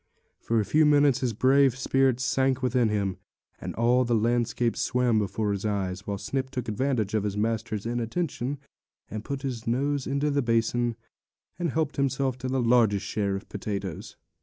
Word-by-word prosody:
For 115 0 0
a 105 - 0
few 155 +10 +3
minutes 145 -3 +4
his 125 -3 0
brave 130 +3 +3
spirit 135 -1 +2
sank 130 -1 +1
within 125 -3 +2
him, 100 -3 -1 0.4
and - - -6
all 120 +2 +3
the 120 -1 +1
landscape 120 +1 +1
swam 125 -3 +1
before 105 +1 -1
his 100 -1 -3
eyes; 100 -2 -2
while 100 -1 -2
Snip 130 +7 -3
took 125 -3 -5
advantage 110 -2 -1
of 110 - +2
his 105 0 -3
master's 110 0 -2
inattention 120 +3 -2 0.5
to 110 - -3
put 135 +5 -5
his 120 -5 -4
nose 140 +3 0
into 140 +2 0
the 140 0 +1
basin, 115 0 +1 0.6
and 175 -1 0
help 150 +1 -1
himself 135 -1 0
to 130 - -4
the 130 -1 0
largest 115 -4 +3
share 100 -2 -1
of 100 - -4
the - - -23
potatoes. 100 -5 -5
120 Hz, 180 wpm, -27 LUFS, 110-135 Hz, 0.6 s, minutes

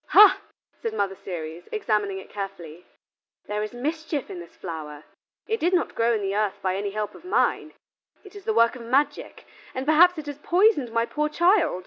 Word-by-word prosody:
"Ha!" 420 -1 +7 0.4
said 455 -1 -3
Mother 195 - 0
Ceres, 170 -3 -7
examining 210 - 0
it 190 - -10
carefully, 180 -5 -7 0.6
"there 210 0 -3
is 215 - -3
mischief 305 +3 -3
in 180 - -6
this 170 -1 -12
flower: 155 -4 -7 0.4
it 450 0 -1
did 355 +3 +2
not 350 - 0
grow 230 +1 +2
in 210 - -2
the 195 0 -1
earth 205 -1 0
by 185 -1 0
any 200 +1 -2
help 210 0 -3
of - - -14
mine; 365 - 0 0.5
it 395 -1 -15
is 405 -1 -11
the 445 - +1
work 235 - +4
of 250 - -9
magic, 260 +5 -1 0.3
and 260 +1 -3
perhaps 340 +4 +6
it 310 - -6
has 290 -1 -7
poisoned 350 - +3
my 230 0 +1
poor 300 +4 -1
child." 345 - +3
230 Hz, 195 wpm, -25 LUFS, 195-325 Hz, 0.6 s, Ha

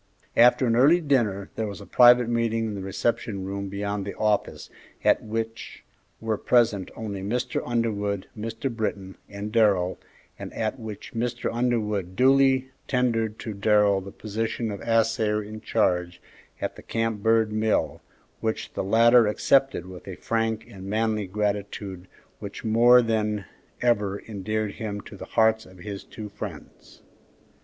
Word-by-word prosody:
After 125 +2 +6
an 115 -1 +2
early 145 +8 +6
dinner 115 - 0
there 110 - -2
was 100 - -7
a - - -10
private 120 -1 +6
meeting 115 -1 0
in 110 - -3
the 100 - -5
reception 95 0 -2
room 100 0 -4
beyond 100 +1 -3
the 100 - -6
office, 105 -1 -1 0.3
at - - +4
which 115 +1 -5 0.4
were 110 -2 -2
present 110 -6 +2
only 100 -3 -5
Mr. 120 +6 -2
Underwood, 105 -5 -1
Mr. 115 +3 -4
Britton, 100 -4 -3
and 100 +1 -6
Darrell, 100 -5 +2 0.4
and - - -7
at 110 +2 -2
which 110 +1 -8
Mr. 120 +1 -2
Underwood 105 -6 -1
duly 130 +1 +4 0.2
tendered 115 -4 0
to 110 - -6
Darrell 105 -1 +3
the 95 - -9
position 110 +2 -3
of 100 - -6
assayer 110 -2 +1
in 110 +1 -9
charge 90 -6 0 0.4
at - - -3
the - - -10
Camp 115 -2 -2
Bird 110 0 +3
mill, 110 0 0 0.4
which 110 0 -3
the - - -2
latter 115 +3 +5
accepted 135 +3 +2
with 90 0 -11
a 95 - -6
frank 115 +1 -1
and 95 -5 -11
manly 110 0 0
gratitude 100 -2 -3 0.3
which - - -8
more 120 +3 +6
than 105 -3 -1 0.4
ever 105 -5 +1
endeared 110 0 -3
him 105 -1 -5
to - - -12
the - - -8
hearts 110 0 +2
of 95 0 -16
his 100 +1 -7
two 110 -2 -8
friends. - - -10
110 Hz, 150 wpm, -25 LUFS, 100-115 Hz, 0.4 s, After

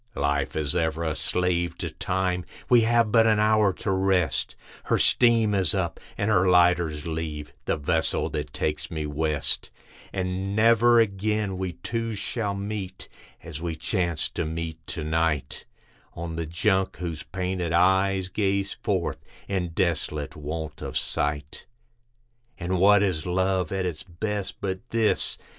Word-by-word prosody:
Life 70 0 0
is 75 -3 -1
ever 80 -1 0
a 80 -2 -1
slave 90 0 0
to - - -4
Time; 90 -1 -1 0.3
we 120 -2 +7
have 115 -1 +3
but 115 0 +5
an 110 -1 +4
hour 105 -1 +4
to 95 - -3
rest, 95 -5 +1 0.3
Her - - +2
steam 115 -3 +4
is 95 -2 +2
up 85 -4 -1 0.2
and 105 +2 +1
her 95 -2 +4
lighters 85 -4 +3
leave, 80 -2 -4
the - - 0
vessel 80 +2 0
that 75 -1 -3
takes 75 +1 -2
me 80 -3 -3
west; 75 0 -1 0.4
And 95 +1 -2
never 115 +2 +5
again 105 -1 0
we 95 -1 -3
two 115 +4 -3
shall 100 0 -2
meet, 100 -2 -5 0.3
as 80 -1 -7
we 85 -1 -3
chance 85 -1 -1
to - - -3
meet 80 0 -5
to 80 - -4
night, 80 -2 -1 0.5
On 85 -1 -5
the 85 -1 -3
Junk, 95 +3 +1
whose 85 -4 -4
painted 90 -2 -3
eyes 95 +2 +3
gaze 100 0 0
forth, 95 -4 -2 0.2
in 95 -3 -1
desolate 80 -4 -1
want 75 0 -5
of - - -3
sight. 70 -1 -2 0.9
And 90 0 -1
what 100 +2 +6
is 90 -5 -1
love 95 +1 +1
at 95 -1 -1
its 85 -4 -3
best, 100 +3 -4
but 95 -1 -2
this? 115 -2 +1
90 Hz, 150 wpm, -26 LUFS, 80-100 Hz, 0.9 s, we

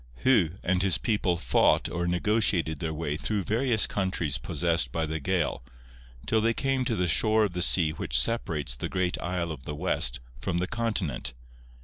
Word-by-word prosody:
Hu 115 -11 +4
and 90 0 +1
his 95 -2 +3
people 105 -6 0
fought 85 - +2
or 85 0 -3
negotiated 90 -4 +1
their 80 +1 -3
way 75 -2 -3
through 105 +3 -2
various 115 +2 +2
countries 90 -8 -2
possessed 85 +6 0
by 80 -1 -1
the 80 0 -3
Gael, 90 0 -1 0.6
till 110 -1 +2
they 115 +1 +1
came 135 -1 0
to 115 - 0
the 90 -3 0
shore 110 +6 +3
of 100 -4 -1
the 90 - -3
sea 85 -3 +3
which 80 - 0
separates 75 - 0
the - - -5
great 90 -1 -1
isle 85 -1 -2
of 70 -4 -9
the 75 - -5
west 75 -8 +1 0.2
from 90 -2 -2
the 90 - 0
continent. 90 - -2
90 Hz, 185 wpm, -27 LUFS, 80-105 Hz, 0.6 s, Hu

